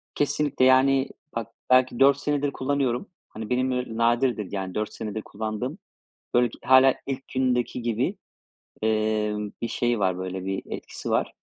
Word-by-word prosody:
Kesinlikle, 145 -2 +1
yani, 130 +1 +4 0.3
bak 115 -1 -2 0.2
belki 130 -1 +4
4 140 0 +6
senedir 145 0 0
kullanıyorum. 135 - -1 0.2
Hani 110 -1 -7
benim 125 -2 -1
nadirdir 120 -3 +1
yani 95 -2 -4
4 105 0 -2
senedir 110 -1 -5
kullandığım, 110 - -4 0.6
böyle 120 0 +4 0.2
hâlâ 130 0 +6
ilk 135 -1 -5
gündeki 125 -1 0
gibi, 120 +1 -1 0.7
emm, 110 -1 0
bir 115 - -1
şey 120 0 0
var 95 -2 +1
böyle 95 0 -5
bir 95 0 -2
etkisi - - -7
var. - - 0
120 Hz, 140 wpm, -25 LUFS, 110-130 Hz, 0.7 s, 4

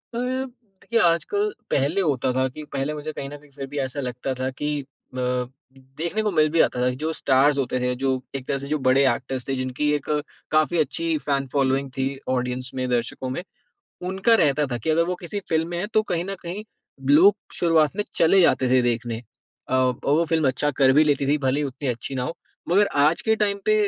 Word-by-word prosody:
Up - - -1 0.6
देखिए 235 -1 0
आजकल 405 - +2 0.2
पहले 145 +8 +2
होता 135 -7 +1
था 130 +1 +1
कि 155 +4 -9
पहले 140 +2 -1
मुझे 150 +1 -5
कहीं 140 -2 -6
न 145 - -8
कहीं 145 0 -20
फिर 135 0 -6
भी - - -4
ऐसा 135 +1 -3
लगता 125 0 -3
था 130 0 0
कि 145 +3 -4
अ, 130 -1 -12 0.8
देखने 170 +7 -1
को 210 - +1
मिल 155 -2 +3
भी 165 - +1
जाता 125 - +3
था 125 - +3
जो 160 - 0
स्टार्स 140 0 +3
होते 130 -1 -1
थे, 125 0 0
जो 130 0 0
एक 130 -1 -5
तरह 140 - 0
से 140 - -6
जो 155 - 0
बड़े 135 +2 +5
एक्टर्स 130 +1 -5
थे, 135 - 0
जिनकी 130 +3 -1
एक 145 - -2 0.5
काफ़ी 155 +2 +2
अच्छी 155 +3 0
फैन 140 -2 -1
फ़ॉलोइंग 135 0 +1
थी 130 - +1 0.2
ऑडियंस 125 0 -2
में, 130 -1 -1
दर्शकों 125 +1 -2
में 130 - -3 0.7
उनका 195 +5 +3
रहता 145 0 +2
था 120 - -1
कि 120 - -2
अगर 160 +2 +3
वो 180 - -2
किसी 190 +4 -4
फ़िल्म 160 0 +1
में 175 - -4
हैं 190 - -2
तो 215 - +5
कहीं 175 0 0
न 195 - -4
कहीं 180 +5 -5 0.5
लोग 180 +8 +7 0.2
शुरुआत 165 -1 +3
में 210 - 0
चले 165 +4 +5
जाते 130 -7 +3
थे 130 0 +5
देखने। 120 -1 -1 0.5
अ, 130 - -1
और 130 -1 +3
वो 155 +4 +3
फ़िल्म 160 -4 +1
अच्छा 145 +3 0
कर 130 -1 +6
भी 155 +3 +5
लेती 140 -2 +1
थी 145 +2 +2
भले 135 +1 +1
ही - - 0
उतनी 135 +1 -4
अच्छी 120 +2 -3
ना 125 - -1
हो। 165 +7 -4 0.3
मगर 200 +4 +4
आज 150 +3 +4
के 220 - +3
टाइम 200 -2 0
पे 215 - +4
145 Hz, 225 wpm, -24 LUFS, 130-165 Hz, 0.8 s, लोग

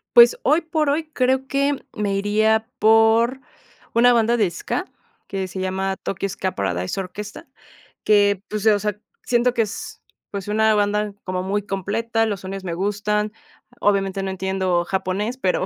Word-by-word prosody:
Pues 235 0 +8
hoy 305 +5 +4
por 315 -3 0
hoy, 310 +2 -1
creo 260 +1 +1
que 280 0 +1 0.2
me 205 -2 -1
iría 220 +3 +2
por 225 +4 +4 0.5
una 245 +1 +6
banda 235 0 +3
de 210 -5 +2
Ska, 175 - -3 0.4
que 190 -1 -3
se 190 - -7
llama 190 +1 -1
Tokyo 195 +1 -3
Ska 185 0 -3
Paradise 95 - -2
Orchestra 205 +5 -8 0.6
que 205 -2 +4
pues, 215 0 -3
eh, 215 - +6
o 205 - +1
sea, 210 0 -3 0.2
siento 245 0 +2
que 230 - +2
es, 200 -1 -7 0.3
pues, 200 -1 -5
una 220 +1 +3
banda 210 0 0
como 185 0 -3
muy 205 +2 -1
completa, 220 +4 -1
los 205 -4 -3
sonidos 195 0 -6
me 175 -2 -3
gustan, 210 +2 -1 0.5
obviamente 195 -1 +1
no 190 - -2
entiendo 190 -2 0
japonés, 195 +6 -2
pero 185 -4 0
205 Hz, 165 wpm, -22 LUFS, 190-230 Hz, 0.6 s, Pues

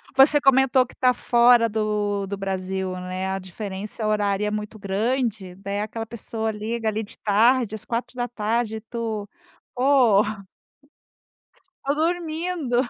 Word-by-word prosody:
Você 275 +2 +7
comentou 265 -1 +4
que - - -17
tá 255 -1 +3
fora 240 -1 +4
do 210 -2 -1
do 200 +1 -4
Brasil, 190 -1 -3
né? 185 +1 -4
A 190 0 -2
diferença 200 +3 -6
horária 210 -1 +1
é - - -1
muito 210 +1 -5
grande, 210 -1 -1
daí 200 +1 -4
aquela 225 +1 -4
pessoa 225 -1 -3
liga 220 +2 -3
ali, 220 +1 0
de 215 +2 -10
tarde, 220 +2 +3
às 215 - -8
16h 235 -2 -2
e - - -8
tu 225 -2 -4 0.5
"Pô. 250 -6 +5 1.6
Tô 280 +1 +1
dormindo". 325 -3 -1
220 Hz, 135 wpm, -24 LUFS, 205-245 Hz, 1.6 s, Você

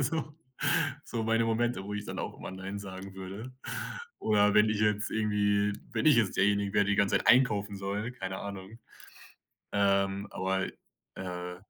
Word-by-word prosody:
so 150 +2 -1 0.7
so 115 -2 -3
meine 115 +1 +2
Momente, 115 -3 0
wo 105 +1 -5
ich 105 0 -4
dann - - -6
auch - - -4
immer - - -7
nein 95 +2 -6
sagen 95 -1 -8
würde. 95 +7 -7 0.7
Oder 105 -1 +3
wenn 105 +1 +6
ich 105 -1 0
jetzt 105 0 +1
irgendwie 105 -1 +2 0.2
wenn 115 +5 0
ich 150 - +7
jetzt 110 -5 +2
derjenigen 100 +1 +2
wäre, 105 -1 +5
der 100 - +1
die - - +1
ganze 100 -2 +3
Zeit - - -7
einkaufen 105 -5 +4
soll, 100 +5 -3
keine 95 -4 -5
Ahnung. 100 +2 -7 0.9
Ähm, 100 0 +2
aber 95 +1 -1 0.5
äh, 90 -1 -5
100 Hz, 170 wpm, -30 LUFS, 95-110 Hz, 0.9 s, ich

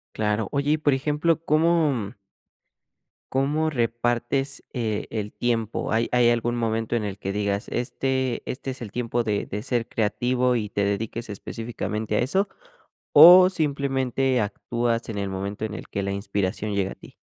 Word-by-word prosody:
Claro, 105 -1 0
oye, 140 +1 +1
y 155 - +3
por 145 -2 +2
ejemplo, 150 +4 0
¿cómo 155 -9 +2 1.2
cómo 150 +4 +1
repartes, 120 +3 -1
eh, 110 -4 -2
el 105 -2 -4
tiempo? 115 -2 -1
¿Hay 115 +1 +2
hay 120 -1 +4
algún 120 0 +1
momento 115 0 -1
en 110 - 0
el 100 -1 -4
que 95 - -4
digas: 100 0 -1
"Este 130 0 -1
este 135 +1 -5
es 130 -2 -5
el 105 - -8
tiempo 120 -1 -1
de 105 -2 -1
de 105 +2 -5
ser 120 -4 -1
creativo" 125 +4 +1
y 105 -3 -2
te 100 -1 0
dediques 105 +2 -3
específicamente 110 0 -4
a - - +2
eso? 190 +11 +1 0.6
¿O 180 +5 +10
simplemente 135 -5 0
actúas 115 +3 -2
en 105 -2 -4
el 100 - -2
momento 100 +2 -4
en 110 -1 -4
el - - -8
que 100 - -3
la 100 - -2
inspiración 100 +1 -2
llega 95 -1 0
a - - -10
ti? - - -15
120 Hz, 165 wpm, -24 LUFS, 105-135 Hz, 1.2 s, O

